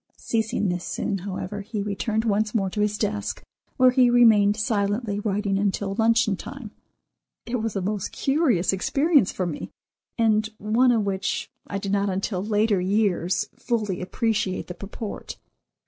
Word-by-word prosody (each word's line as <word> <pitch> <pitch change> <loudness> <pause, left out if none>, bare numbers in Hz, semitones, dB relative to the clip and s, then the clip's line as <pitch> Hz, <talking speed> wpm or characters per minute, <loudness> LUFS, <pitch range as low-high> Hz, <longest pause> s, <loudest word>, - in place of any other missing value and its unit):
Ceasing 220 -3 -1
this 180 0 -2
soon, 195 - -2
however, 195 +2 -5
he 210 +1 -5
returned 210 +2 -1
once 215 +1 0
more 195 -4 +1
to 210 - -2
his 210 0 +1
desk, 210 -1 -2 0.3
where 255 -1 +6
he 250 -1 +4
remained 220 -4 +5
silently 205 0 0
writing 200 -1 0
until 200 0 -1
luncheon 225 0 +3
time. 240 +2 -9 0.7
It 245 +1 -2
was 225 -2 -3
a 195 - 0
most 205 0 -2
curious 270 - +1
experience 280 - +3
for 185 - -2
me, 165 -4 -5 0.5
and 215 -2 +2
one 230 +5 +3
of 225 -3 +2
which, 195 0 -2 0.2
I 200 - -3
did 195 0 -4
not 200 0 +1
until 190 0 -2
later 210 -2 +2
years, 185 -3 +1
fully 210 -7 -2
appreciate 205 0 -1
the 180 - -7
purport. 200 +4 -7
210 Hz, 155 wpm, -24 LUFS, 195-225 Hz, 0.7 s, where